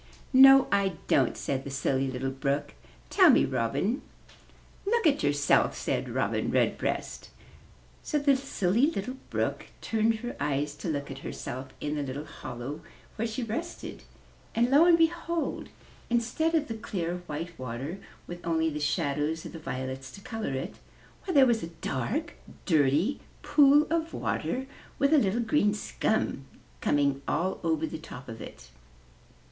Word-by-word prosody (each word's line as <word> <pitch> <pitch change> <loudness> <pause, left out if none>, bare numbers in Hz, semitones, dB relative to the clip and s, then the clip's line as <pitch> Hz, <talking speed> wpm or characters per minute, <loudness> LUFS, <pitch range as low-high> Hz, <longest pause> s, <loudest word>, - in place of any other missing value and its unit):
''No, 270 +1 +9
I 200 -1 +2
don't," 130 -4 +3
said 135 -1 -2
the 140 - -6
Silly 135 0 0
Little 130 +1 -2
Brook. 140 +2 -2 0.4
"Tell - - +7
me, - - +6
Robin." 195 - -1 0.8
"Look 460 +4 +1
for 280 - +3
yourself," 145 0 +3
said - - -2
Robin - - 0
Redbreast. - - -1 0.7
So 300 - -1
the 285 -1 +4
Silly 245 -2 +1
Little 255 -2 -4
Brook - - -2
turned 225 0 +1
her 240 +2 -6
eyes 145 +1 -1
to - - -6
look 140 -2 -3
at 135 - -7
herself 130 +2 -6
in 150 0 -2
the 150 - -1
little 140 +2 -4
hollow 135 +3 -7 0.3
where 225 +2 -1
she 225 +3 -4
had 230 -3 -4
rested 335 +9 -5 0.5
and, 240 +3 +2
lo 295 +5 +7
and 345 -1 +6
behold, 335 0 0 0.4
instead 245 +8 +1
of 305 -2 +1
the 225 - -3
clear, 180 -5 -3
white 165 +3 -5
water, 130 +8 -5 0.3
with 175 0 -8
only 160 -1 +1
the 150 - -4
shadows 150 +1 -1
of - - -8
the 165 - -7
violets 130 -2 -5
to 200 - -11
color 220 - -4
it, 130 - -5 0.5
why, 370 - -2
there 275 -2 +8
was 235 -3 +2
a - - -4 0.2
dark, 270 - -2 0.3
dirty 155 - +2 0.2
pool 290 0 +6
of 330 0 -1
water 260 +1 -2 0.3
with 280 +2 +3
a 305 - +7
little 215 +1 +1
green 220 -3 +2
scum 210 -8 -1 0.4
coming 140 -1 +2
all 180 +5 0
over 160 -1 +1
the 160 0 -6
top 135 -4 -10
of 115 -2 -8
it. 60 -1 -11
175 Hz, 160 wpm, -28 LUFS, -, 0.8 s, No